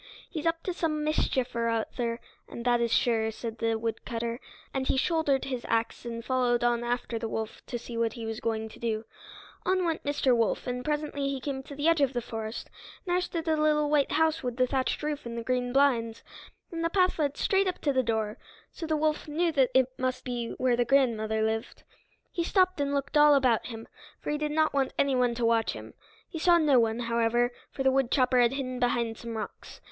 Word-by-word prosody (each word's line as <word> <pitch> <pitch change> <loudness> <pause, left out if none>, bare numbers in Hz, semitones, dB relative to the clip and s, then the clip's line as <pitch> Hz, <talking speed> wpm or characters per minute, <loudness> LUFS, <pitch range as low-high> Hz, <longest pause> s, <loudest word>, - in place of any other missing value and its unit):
"He's 320 -2 -3
up 330 0 0
to 365 - -2
some 305 -3 -1
mischief 260 -4 0
or 230 0 +1
other, 230 +1 -2 0.3
and 235 - -7
that 240 -1 +3
is 235 -1 0
sure," 225 -2 +2
said 225 0 -6
the 225 0 +1
woodcutter. 230 +1 -3 0.3
And 265 -1 -1
he - - +2
shouldered 290 -2 +1
his 255 -3 -4
axe 230 +1 -1
and 230 0 -5
followed 250 -2 +1
on 240 0 +2
after 240 -1 -2
the 225 0 -3
wolf 220 0 -4
to 245 - -3
see 235 0 -6
what 230 -1 +1
he 230 -2 -6
was 225 0 -4
going 220 -1 -2
to - - -14
do. 225 -1 -2 0.6
On 370 -1 +1
went 330 -2 -1
Mr. 285 -3 +2
Wolf, 230 -2 0
and 250 0 -3
presently 295 -1 -1
he 275 -1 -2
came 265 0 -4
to 280 +1 -10
the 290 +3 0
edge 330 -2 +4
of 275 -1 +2
the 245 - 0
forest, 225 -1 -5 0.4
and 350 - -1
there 360 - +3
stood 335 -2 -3
the 320 -1 +2
little 300 -1 +2
white 290 -2 +2
house 320 +1 +2
with 245 -2 -3
the 255 - +4
thatched 260 +1 -1
roof 300 -3 -3
and 235 0 -5
green 250 0 0
blinds, 245 -5 +2 0.5
and 330 -1 -3
the 335 - +2
path 365 -1 +2
led 290 -2 0
straight 390 0 +2
up 365 - -1
to 285 - +1
the 260 - +3
door, 220 -2 -2 0.3
so 330 - -6
the 310 -1 +1
wolf 305 0 0
knew 330 +3 +1
that 270 -5 +3 0.3
must 255 0 -2
be 240 -2 -3
where 255 -1 +2
the 240 - +2
grandmother 225 -4 +2
lived. 220 +1 -2 0.5
He 340 - -1
stopped 370 -2 +2
and 280 0 0
looked 280 +1 -1
all 295 0 +7
about 255 -5 +2
him, 225 -2 -8 0.3
for - - -4
he 295 - -1
did 300 0 -1
not 310 0 +2
want 275 -2 +1
anyone 250 -3 +2
to 235 0 0
watch 230 -1 +2
him. - - -9 0.3
He 330 - -6
saw 345 +1 +5
no 295 -6 +4
one, 225 +1 +1
however, 235 +1 +1 0.2
for 270 - -4
the 265 - +4
woodchopper 255 -1 +2
had 240 +1 +3
hidden 255 -2 -3
behind 235 -2 0
some 230 -1 -5
rocks. 215 - -7
255 Hz, 220 wpm, -28 LUFS, 230-295 Hz, 0.6 s, all